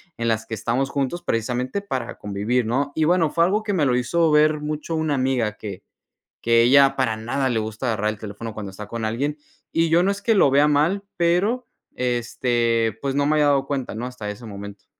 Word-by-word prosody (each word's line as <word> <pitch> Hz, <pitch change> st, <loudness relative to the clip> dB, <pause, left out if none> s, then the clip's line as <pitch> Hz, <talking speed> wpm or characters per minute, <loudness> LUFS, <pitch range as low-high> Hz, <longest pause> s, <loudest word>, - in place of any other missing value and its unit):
en 115 Hz, -3 st, -3 dB
las 110 Hz, 0 st, 0 dB
que -, -, -7 dB
estamos 120 Hz, +5 st, -1 dB
juntos 145 Hz, +5 st, -2 dB
precisamente, 125 Hz, -, -1 dB
para 130 Hz, -11 st, -4 dB
convivir, 105 Hz, +5 st, -1 dB
¿no?, 140 Hz, +5 st, -1 dB
y 160 Hz, -, +1 dB
bueno, 165 Hz, -1 st, +3 dB
fue 170 Hz, -, +3 dB
algo 205 Hz, +5 st, +1 dB
que 205 Hz, -2 st, -2 dB
me 155 Hz, -6 st, +2 dB
lo 125 Hz, -1 st, +2 dB
hizo 160 Hz, +6 st, +1 dB
ver 150 Hz, 0 st, +4 dB
mucho 150 Hz, +2 st, -3 dB
una 155 Hz, -2 st, 0 dB
amiga, 130 Hz, -5 st, 0 dB
que 100 Hz, -4 st, -7 dB, 0.6 s
que 115 Hz, 0 st, +4 dB
ella 135 Hz, +3 st, +5 dB
para 115 Hz, -5 st, 0 dB
nada 130 Hz, +4 st, -1 dB
le 115 Hz, -2 st, 0 dB
gusta 110 Hz, +3 st, -4 dB
agarrar 110 Hz, -2 st, 0 dB
el 105 Hz, -, -9 dB
teléfono 110 Hz, +2 st, -7 dB
cuando 105 Hz, -2 st, -6 dB
está 105 Hz, +2 st, -9 dB
con 115 Hz, 0 st, -4 dB
alguien. 140 Hz, +7 st, -2 dB, 0.3 s
Y 165 Hz, 0 st, +2 dB
yo 170 Hz, +2 st, +4 dB
no 195 Hz, -, +2 dB
es 200 Hz, -, -5 dB
que 225 Hz, -, +2 dB
lo 140 Hz, -, +5 dB
vea 145 Hz, +2 st, +5 dB
mal, 155 Hz, +7 st, +2 dB
pero, 200 Hz, +9 st, +1 dB, 0.3 s
este, 120 Hz, -2 st, 0 dB
pues, 140 Hz, -1 st, -2 dB
no 140 Hz, 0 st, +2 dB
me 155 Hz, +1 st, +2 dB
había 150 Hz, -1 st, +4 dB
dado 140 Hz, -1 st, +2 dB
cuenta, 135 Hz, -6 st, -3 dB
¿no?, 120 Hz, +3 st, -4 dB
hasta 125 Hz, -5 st, -6 dB
ese 105 Hz, +3 st, -8 dB
momento. 100 Hz, -1 st, -9 dB
130 Hz, 220 wpm, -23 LUFS, 115-155 Hz, 0.6 s, ella